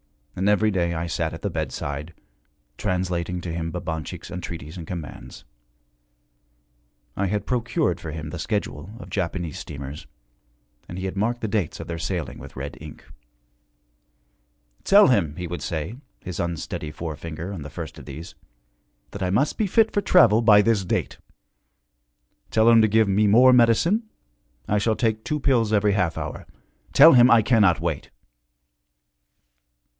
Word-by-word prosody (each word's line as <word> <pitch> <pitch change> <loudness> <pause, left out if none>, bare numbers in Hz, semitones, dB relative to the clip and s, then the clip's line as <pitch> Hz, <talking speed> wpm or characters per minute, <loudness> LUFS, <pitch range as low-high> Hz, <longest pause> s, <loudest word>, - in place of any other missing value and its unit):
And 95 +3 +1
every 105 +1 +3
day 85 -3 0
I 80 +1 -2
sat 85 - -2
at - - -12
the - - -1
bedside, 70 +4 -4 0.6
translating 90 +1 -2
to 85 -1 -5
him 85 0 -3
Babanchik's 80 -3 -6
entreaties 85 -3 -7
and 85 -3 -8
commands. 85 -5 -8 1.7
I 100 - 0
had 105 +2 -2
procured 120 - 0
for 80 - -7
him 80 0 -6
the 90 - -6
schedule 100 -2 -4
of - - -11
Japanese 85 -3 -3
steamers, 70 0 -8 0.8
and 85 - -7
he 95 - -4
had 95 - -4
marked 115 +4 -1
the 110 - -1
dates 100 -5 -2
of - - -6
their 85 -1 -5
sailing 85 -1 -4
with - - -12
red 70 +1 -6
ink. 75 -1 -11 1.8
'Tell 205 -3 +6
him,' 90 - +1
he 90 - -5
would 85 -2 -5
say, 80 - -4 0.2
his 90 -2 -6
unsteady 85 -2 -4
forefinger 80 +3 -6
on 90 - -7
the 75 - -7
first - - -8
of - - -12
these, 85 +3 -9 0.8
'that 100 - -8
I 90 - 0
must 130 +11 +1
be 215 - +2
fit 220 +3 +3
for 205 - 0
travel 115 - +5
by 105 -2 +6
this 110 -3 +2
date. 90 - -2 1.3
Tell 110 0 +3
him 115 -1 +7
to 110 - +4
give 110 0 +3
me 105 +2 +2
more 125 +5 +6
medicine 165 - +3 0.6
I 105 - +1
shall 110 +2 +1
take 110 -1 -1
two 150 - -2
pills 120 -6 +2
every 105 -1 +3
half 90 -4 0
hour. - - -6 0.4
Tell 160 +4 +8
him 125 -1 +7
I 115 -2 +6
cannot 105 -7 +4
wait.' - - -3
95 Hz, 160 wpm, -24 LUFS, 85-110 Hz, 1.8 s, Tell